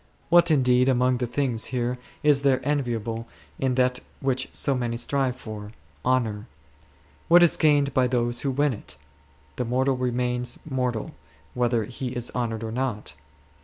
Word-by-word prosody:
What, 175 0 +6
indeed, 125 -3 +4
amongst 125 -1 +2
the 125 - -1
things 120 -2 -1
here 125 0 -2 0.2
is 145 -2 +4
there 135 -2 +3
enviable 115 -5 -2 0.3
in 130 -2 +1
that 125 -1 +2 0.2
which 130 -1 -1
so 140 - +1
many 120 -2 -2
strive 135 0 0
for, 105 -3 -8
— 70 +1 -33
honour? 110 -3 -1 0.8
What 175 +1 +7
is 170 - +4
gained 145 -2 +3
by 130 -1 +3
those 120 -1 0
who 140 - -1
win 140 +1 +1
it? 105 - -10 0.6
The 125 - -1
mortal 130 +3 +1
remains 125 0 -1
mortal 125 -5 -2 0.4
whether 120 -2 +1
he 125 +3 -5
is 120 -1 -1
honoured 115 -2 -2
or 110 - -4
not. 115 - -3
125 Hz, 160 wpm, -25 LUFS, 120-135 Hz, 0.8 s, What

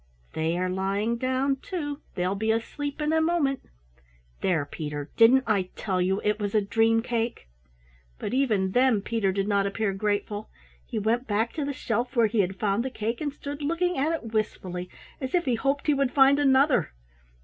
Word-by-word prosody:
"They 160 +2 0
are 185 +1 0
lying 195 +5 -1
down, 260 +2 0
too, 290 -2 -5
they 180 0 0
will 190 - 0
be 220 +2 0
asleep 285 +6 -3
in 300 +1 +1
a 320 - +3
moment! 315 -5 +1 0.8
There, 165 -6 +1
Peter, 145 -1 -6
didn't 250 +4 +6
I 195 -4 +1
tell 185 -3 -1
you 190 +2 +1
it 210 0 +1
was 205 0 -2
a - - +6
dream 225 +2 +2
cake?" 235 - -2 0.7
But - - -4
even 215 -8 +1
then 245 -3 +3
Peter 220 -4 0
did 195 +1 -1
not 200 -1 +2
appear 200 0 -1
grateful. 205 +1 -2 0.4
He - - -4
went 230 +4 0
back 220 +2 0
to 300 -3 -2
the 285 - -2
shelf 250 -1 -2
where 235 -2 +5
he 220 +1 0
had 190 -1 0
found 205 +2 +1
the 265 - -2
cake 230 +1 -3
and 295 -2 -1
stood 285 +1 -7
looking 335 +4 0
at 290 +4 +1
it 235 -9 -4
wistfully, 180 -4 -2 0.3
as 260 +4 -2
if 350 -2 +1
he 255 - +1
hoped 275 +4 0
he 300 - +4
would 275 -2 +1
find 275 0 +6
another. 270 - +3
225 Hz, 195 wpm, -26 LUFS, 200-275 Hz, 0.8 s, didn't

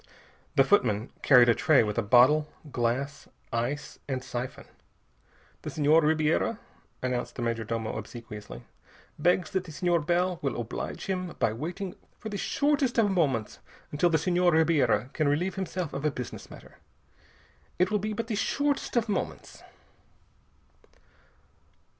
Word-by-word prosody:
The 135 - +6
footman 120 - +2
carried 125 -3 +7
a 120 - +6
tray 145 +1 +4
with 105 -1 -2
a 115 - +1
bottle, 130 +8 +5 0.2
glass, 130 +4 -2 0.3
ice, 125 +6 -3
and 130 -2 -3
siphon. 125 +1 -5 1.0
"The - - -5
Senhor 155 +2 +4
Ribiera," 155 +7 +1 0.5
announced 125 -1 -2
the 120 - -4
major 115 -1 -1
domo 115 0 -3
obsequiously, 110 -1 -8 0.6
"begs 180 -1 +2
that 190 -1 -1
the 165 - -9
Senhor 175 +2 +1
Bell 175 +3 0
will 135 -3 -2
oblige 115 -1 -5
him 185 -2 -3
by 110 - +1
waiting 175 - -5 0.2
for 220 - -7
the 205 - -4
shortest 280 +1 +1
of 215 -3 +4
moments 140 - 0 0.3
until 150 +4 +2
the 160 - +3
Senhor 175 +2 +2
Ribiera 145 -7 +2
can 155 - +1
relieve 170 +6 +1
himself 185 -3 -4
of 140 - -4
a 155 - +3
business 125 -4 -7
matter. - - -14 1.0
It 180 +2 +2
will 210 - +2
be 215 +2 -3
but 230 +2 -3
the 225 - -4
shortest 280 +5 0
of 230 -1 +2
moments." 205 - -4
155 Hz, 145 wpm, -28 LUFS, 125-185 Hz, 1.0 s, carried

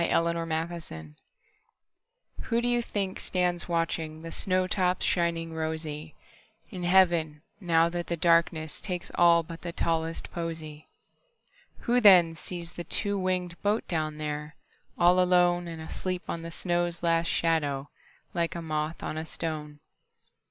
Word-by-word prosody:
Everlasting 165 - -1
Flowers - - -30 1.3
WHO 235 0 +1
do 240 - 0
you 240 0 +2
think 195 -4 -3
stands 180 -1 0
watchingThe 165 -1 -2
snow 185 -1 +1
tops 185 -1 +1
shining 170 -1 0
rosyIn 160 -1 -4 0.6
heaven, 175 -5 +2 0.2
now 165 -4 +3
that 175 0 -4
the 170 - -2
darknessTakes 170 +2 +1
all 170 -1 +5
but 165 +1 -9
the 175 - -4
tallest 165 -1 -2
posy? 160 -3 -6 0.9
Who 245 0 +2
then 180 -6 +7
sees 170 0 -7
the 175 - -7
two 200 +3 0
wingedBoat 185 +3 -1
down 155 -3 -2
there, 150 0 -4 0.4
all 175 +1 +5
aloneAnd 175 -2 +3
asleep 180 +3 -4
on 170 - -3
the 165 - -6
snow's 175 0 -1
last 165 0 +2
shadow, 145 -4 0 0.4
Like 170 -1 -1
a 170 - -4
moth 155 0 -3
on 155 - -3
a 160 - -5
stone? 150 -3 -5
170 Hz, 130 wpm, -28 LUFS, 160-180 Hz, 1.3 s, then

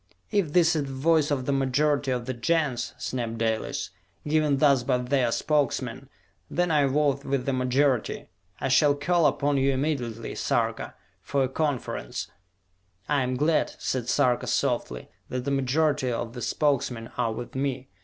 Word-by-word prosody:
"If 185 -8 +1
this 170 -2 +4
is 150 -2 0
the - - -6
voice 150 +2 +2
of 135 -3 -1
the 140 - 0
majority 140 +1 +1
of 125 -2 -1
the 130 - -3
Gens," 130 -1 0
snapped 115 -3 -3
Dalis, 110 -1 -2 0.4
"given 150 -2 +2
thus 140 -2 +4
by 125 +1 +1
their 125 -1 +1
Spokesmen, 135 -2 -1 0.4
then 175 0 0
I 145 -3 +4
vote 140 0 +1
with 135 -3 -1
the 135 - 0
majority! 130 0 +1 0.3
I - - -1
shall 145 +2 +4
call 170 +3 +2
upon 145 0 +1
you 135 +1 +3
immediately, 130 -5 -2
Sarka, - - -1 0.3
for 140 -1 0
a - - +1
conference!" 135 - -3 0.8
"I 145 -2 +2
am 130 0 -1
glad," 155 +3 +1
said 125 -3 -2
Sarka 125 -4 +2
softly, 60 -1 -1 0.2
"that 125 0 -3
the 140 - -1
majority 140 0 +1
of 115 0 -3
the 125 - -7
Spokesmen 125 -6 0
are 120 -2 0
with 120 +2 -6
me. 130 -1 -2
135 Hz, 165 wpm, -26 LUFS, 125-145 Hz, 0.8 s, this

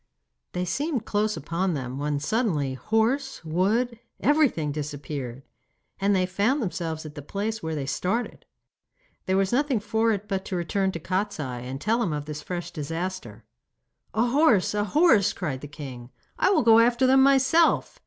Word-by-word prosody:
They 180 0 -1
seemed 270 - -2
close 215 0 0
upon 170 +4 -1
them, 130 -1 -5
when 145 0 -1
suddenly 150 - 0
horse, 225 - 0
wood, 215 +9 0 0.2
everything 275 - +2
disappeared, 145 -3 -5 0.6
and 200 +1 +2
they 185 -1 +2
found 205 +10 +1
themselves 165 - -3
at 150 - -8
the 145 - -8
place 210 +8 -3
where 160 -2 -3
they 140 -2 -3
started. 185 - -2 0.8
There 190 0 +2
was 195 -1 +1
nothing 275 -2 +2
for 225 +2 +1
it 205 -1 -3
but 190 -1 -2
to 190 - -4
return 190 +3 0
to 165 - -4
Kostiei, 165 -9 -3
and 135 +1 -5
tell 225 - +1
him 180 -9 0
of 150 -1 -4
this 150 0 -6
fresh 175 +2 -5
disaster. 165 - -5 0.7
'A 225 +2 +3
horse! 250 - +3
a 205 0 0
horse!' 215 - +4
cried 145 -8 -4
the 145 - -7
king. 130 -5 -9 0.3
'I - - +4
will 345 -8 +3
go 225 -1 +7
after 240 +2 +4
them 265 +1 +5
myself. 275 +4 +3
190 Hz, 170 wpm, -26 LUFS, 150-230 Hz, 0.8 s, go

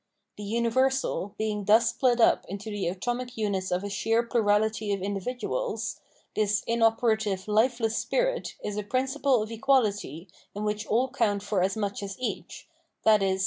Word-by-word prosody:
The 210 - -8
universal 235 0 0
being 210 -2 -2
thus 225 +3 +5
split 245 0 +2
up 230 - +4
into 200 +3 -6
the 205 -4 -2
atomic 245 +7 -3
units 200 -3 -1
of 180 +2 -1
a 205 - -4
sheer 225 +3 +1
plurality 220 -2 +1
of 195 - -3
individuals, 245 - -3 0.3
this 210 -1 +1
inoperative, 225 -4 +1
lifeless 225 +1 +2
spirit - - -1
is 210 0 -3
a 210 - -2
principle 260 +1 +1
of 215 - -8
equahty 215 - +1 0.3
in 205 - -3
which 210 0 -2
all 250 +4 +2
count 205 -1 0
for 205 -2 0
as 190 +4 0
much 200 -2 -2
as 195 -1 -6
each, 255 - -5 0.4
i.e. 195 -3 +4
220 Hz, 155 wpm, -27 LUFS, 205-240 Hz, 0.4 s, thus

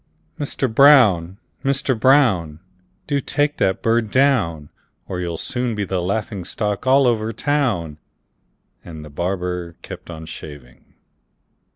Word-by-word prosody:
Mister 140 -2 -1
Brown! 110 - +5 0.3
Mister 135 0 +1
Brown! 110 - +3 0.5
Do 145 -1 0
take 145 +2 -1
that 95 0 0
bird 115 -1 +1
down, 105 - +1 0.4
Or 90 - -4
you'll 85 -2 -3
soon 125 +3 -2
be 105 -1 -2
the 95 -1 -2
laughing 100 +1 -3
stock 105 +5 -3
all 135 +1 +5
over 115 -2 +1
town!" 110 - -1 0.8
And 80 -3 -9
the 75 - -12
barber 90 +1 -3
kept - - -10
on 80 -1 -8
shaving. 75 -6 -12
105 Hz, 130 wpm, -20 LUFS, 85-130 Hz, 0.8 s, Brown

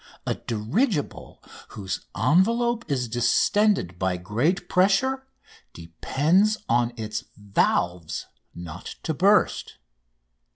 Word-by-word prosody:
A - - 0
dirigible 145 - -2 0.2
whose 95 -3 -6
envelope 225 - +2
is 130 -4 -1
distended 120 - +1
by 95 -1 0
great 130 - -1
pressure 260 +10 +2 0.5
depends 155 - +1
on 120 0 +2
its 110 +1 -4
valves 90 -4 -1 0.3
not 85 +1 -8
to 160 - -1
burst. 200 +7 +2
130 Hz, 90 wpm, -25 LUFS, -, 0.5 s, envelope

